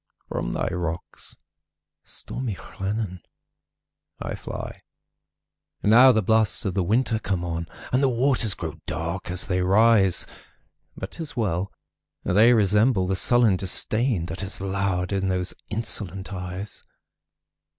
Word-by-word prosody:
From - - -2
thy - - -1
rocks, 85 -2 -5 0.7
stormy 125 -6 -5
Llannon, 95 -1 -4 1.0
I - - -4
fly. - - -7 1.0
Now 120 +5 +8
the 110 -3 +2
blasts 110 +1 +2
of 95 - 0
the 95 - +1
winter 110 +4 +1
come 90 -4 -2
on, 85 -1 -3 0.3
And 130 - +3
the 135 - +4
waters 120 -3 +2
grow 80 -3 -6
dark 85 +5 -3
as 90 0 -1
they 90 -1 0
rise! 100 0 +4 0.7
But 95 - -6
't - - -7
is 145 -4 -6
well!—they 100 +2 0
resemble 105 -1 +3
the 95 +1 0
sullen 115 -1 +4
disdainThat 95 0 0
has 100 +1 -4
lowered 95 -1 -1
in 95 -1 0
those 90 -1 0 0.2
insolent 100 -3 -3
eyes. 90 +2 -6
100 Hz, 125 wpm, -25 LUFS, 90-115 Hz, 1.0 s, Now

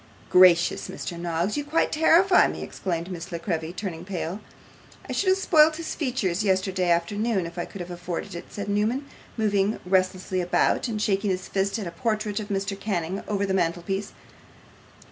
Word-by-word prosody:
'Gracious, 180 -2 +5
Mr. 175 - -5
Noggs, 170 +3 -1
you 290 - -1
quite 300 +3 +1
terrify 345 +4 +5
me!' - - -5
exclaimed 175 -1 -4
Miss 175 +1 -7
La 170 - -2
Creevy, 165 -2 -3
turning 180 -3 -5
pale. 185 0 -4 0.7
'I - - -4
should 390 - +1
have 375 - +4
spoilt 315 -4 +5
his 330 0 -4
features 230 - -1
yesterday 190 -2 +1
afternoon 200 +3 +1
if 170 - -8
I - - -2
could 195 - -9
have 175 0 -7
afforded 175 -1 -5
it,' 170 - -8
said 205 0 -5
Newman, 215 +7 0 0.3
moving 205 -1 +1
restlessly 185 0 +1
about, 180 +7 +1
and 220 -3 -3
shaking 200 -1 +1
his 185 -1 -2
fist 195 +2 0
at 210 - -4
a 170 - -5
portrait 215 +2 -1
of 210 - -5
Mr. 200 0 -2
Canning 190 -2 -2
over 200 -1 0
the 190 - -1
mantelpiece. 180 +2 -1
195 Hz, 180 wpm, -25 LUFS, 175-215 Hz, 0.7 s, Gracious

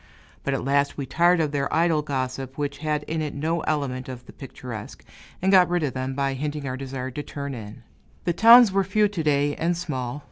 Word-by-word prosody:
But 140 - 0
at 135 - -4
last 140 +1 +1
we 140 - -3
tired 175 +6 +3
of 155 -3 0
their 140 -1 -1
idle 165 -2 +2
gossip, 135 -2 -4
which 145 -1 -3
had 150 -1 -1
in 160 +1 -3
it 150 -2 -4
no 160 +4 -1
element 135 -5 -2
of 125 -1 -8
the - - -13
picturesque, 125 -5 -9 0.4
and 190 - +3
got 185 -2 +6
rid 175 -2 0
of 140 - -1
them 130 0 -3
by 140 0 0
hinting 145 +1 -4
our 130 - -3
desire 130 -1 -5
to 145 - -5
turn 140 -1 -6
in. 110 0 -9 0.4
The 175 - 0
towns 230 +3 +8
were 195 0 +2
few 210 +3 +2
to 200 -5 -4
day, 145 -1 +1
and 170 +1 0
small. 135 -6 -4
145 Hz, 220 wpm, -24 LUFS, 130-165 Hz, 0.4 s, towns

